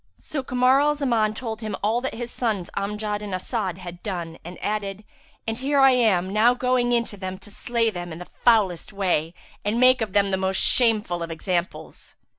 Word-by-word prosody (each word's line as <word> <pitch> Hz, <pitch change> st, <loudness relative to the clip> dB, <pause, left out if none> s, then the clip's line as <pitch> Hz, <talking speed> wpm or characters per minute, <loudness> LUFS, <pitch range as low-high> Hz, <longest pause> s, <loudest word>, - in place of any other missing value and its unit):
So 295 Hz, -3 st, -4 dB
Kamar 255 Hz, +1 st, +3 dB
al 295 Hz, +1 st, +3 dB
Zaman 230 Hz, -7 st, +1 dB
told 225 Hz, -2 st, -5 dB
him 215 Hz, -1 st, -3 dB
all 225 Hz, +4 st, +2 dB
that 265 Hz, -, -3 dB
his 240 Hz, +1 st, -5 dB
sons 210 Hz, -7 st, -2 dB
Amjad 210 Hz, +1 st, -2 dB
and 200 Hz, -3 st, -4 dB
As'ad 190 Hz, -2 st, -3 dB
had 175 Hz, -1 st, -9 dB
done 170 Hz, -5 st, -5 dB
and 175 Hz, +2 st, -9 dB
added, 205 Hz, -1 st, -3 dB, 0.4 s
"And 225 Hz, +1 st, -3 dB
here 280 Hz, +2 st, +1 dB
I 270 Hz, 0 st, +7 dB
am 200 Hz, -7 st, +2 dB
now 230 Hz, +4 st, +5 dB
going 250 Hz, -1 st, +1 dB
in 235 Hz, -1 st, +2 dB
to 205 Hz, -, -11 dB
them 185 Hz, -1 st, -5 dB
to 205 Hz, -, -14 dB
slay 230 Hz, +1 st, 0 dB
them 175 Hz, -2 st, -6 dB
in 160 Hz, -, -6 dB
the 180 Hz, -, -9 dB, 0.2 s
foulest 205 Hz, -8 st, +3 dB
way 180 Hz, -5 st, 0 dB, 0.3 s
and 210 Hz, +3 st, 0 dB
make 255 Hz, 0 st, +5 dB
of 215 Hz, -4 st, -2 dB
them 200 Hz, -1 st, +3 dB
the 190 Hz, -, +1 dB
most 190 Hz, 0 st, 0 dB
shameful 215 Hz, -8 st, +2 dB
of 170 Hz, -, -3 dB
examples." 175 Hz, +3 st, -4 dB
210 Hz, 205 wpm, -24 LUFS, 185-240 Hz, 0.4 s, I